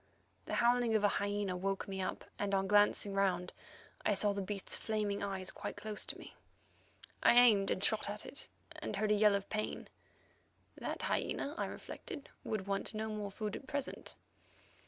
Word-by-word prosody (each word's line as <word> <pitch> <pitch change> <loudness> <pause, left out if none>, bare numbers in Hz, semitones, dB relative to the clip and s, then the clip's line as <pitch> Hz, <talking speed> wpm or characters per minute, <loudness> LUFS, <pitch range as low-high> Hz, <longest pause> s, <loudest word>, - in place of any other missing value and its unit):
The - - -2
howling 240 -1 +4
of 215 - +3
a - - +7
hyena 205 -2 0
woke 195 +2 -1
me 190 -1 -3
up, 185 - -3
and, 200 -1 +1
on 195 0 +2
glancing 205 0 +4
around, 180 -2 +1 0.5
I 210 - +3
saw 205 0 +4
the 200 - -2
beast's 195 0 -3
flaming 210 -2 -1
eyes 190 -2 -2
quite - - -5
close 215 -1 -3
to - - -4
me. - - -11 0.9
I - - +6
aimed 220 -5 +7
and 185 - 0
shot 215 -1 +1
at 210 +1 -4
it, 285 - -5 0.3
and - - -4
heard 215 0 +1
a - - +7
yell 210 -1 +5
of 200 0 -2
pain. 215 0 -2 0.9
That - - -4
hyena, 285 - 0
I - - -1
reflected, 280 - -7
would 210 -3 -2
want 195 +2 -2
no 220 +1 -2
more 210 -1 -3
food 210 +1 -3
at 265 - -8
present. 280 -1 -3
205 Hz, 180 wpm, -35 LUFS, 195-215 Hz, 0.9 s, a